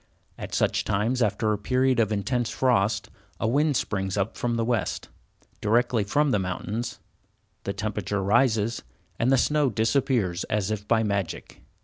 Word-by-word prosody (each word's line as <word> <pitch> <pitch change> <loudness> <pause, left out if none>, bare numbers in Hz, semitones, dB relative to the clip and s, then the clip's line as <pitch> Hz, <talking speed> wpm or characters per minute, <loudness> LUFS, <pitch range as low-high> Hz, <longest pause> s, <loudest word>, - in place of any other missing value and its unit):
At - - -6
such - - +1
times, 115 +6 0
after 110 0 +1
a 105 - -3
period 130 +3 +2
of 110 -2 +2
intense 120 +3 -1
frost, 110 -5 +1 0.3
a - - 0
wind 145 +3 +2
springs 95 -1 -2
up 100 +2 -1
from 120 -1 -1
the 115 -1 0
west, 120 -4 -1 0.5
directly 115 +1 +2
from 145 +8 +1
the 105 - +2
mountains, 95 +5 -4 0.7
the 100 - -2
temperature 100 -1 -2
rises, 115 +1 +2 0.4
and 120 +3 +2
the 135 - +5
snow 150 +2 +2
disappears 115 -5 +1
as 105 -1 -1
if 105 -1 -4
by 115 0 +3
magic. 100 -5 -3
110 Hz, 155 wpm, -26 LUFS, 100-125 Hz, 0.7 s, the